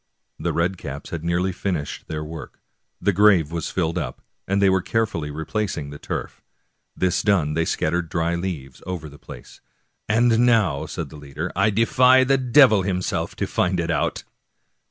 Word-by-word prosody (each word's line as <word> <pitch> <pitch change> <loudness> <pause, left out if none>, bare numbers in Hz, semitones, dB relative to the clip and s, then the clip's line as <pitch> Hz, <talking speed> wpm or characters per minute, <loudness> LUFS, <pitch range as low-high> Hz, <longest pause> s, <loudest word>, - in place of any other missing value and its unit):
The - - -1
red 90 +2 0
caps 70 -1 -7
had 85 -2 -4
nearly 85 +3 0
finished 90 -5 -4
their 75 -1 -4
work, 80 +1 -9 0.4
the 100 - +1
grave 95 -6 +4
was 85 -2 -3
filled 85 -1 -1
up, - - -5 0.3
and 100 +1 +1
they 100 - +4
were 95 -1 +3
carefully 105 -9 -1
replacing 80 0 -3
the 75 - -9
turf. - - -5 0.5
This 90 -1 +1
done 85 -8 +2
they 80 +1 +1
scattered 85 +2 -1
dry 85 +1 0
leaves 85 -7 -5
over 90 -4 -4
the 75 -1 -14
place. - - -12 0.2
" - - -42
And 115 +1 +3
now," 115 - +3
said - - -5
the 75 - -11
leader, 75 +4 -5
" - - -36
I 100 +4 +3
defy 125 +4 +5
the 135 +1 +2
devil 125 -4 +5
himself 90 -3 -2
to - - -2
find 90 0 0
it 85 0 -1
out." 85 - -1
90 Hz, 180 wpm, -23 LUFS, 80-105 Hz, 0.5 s, defy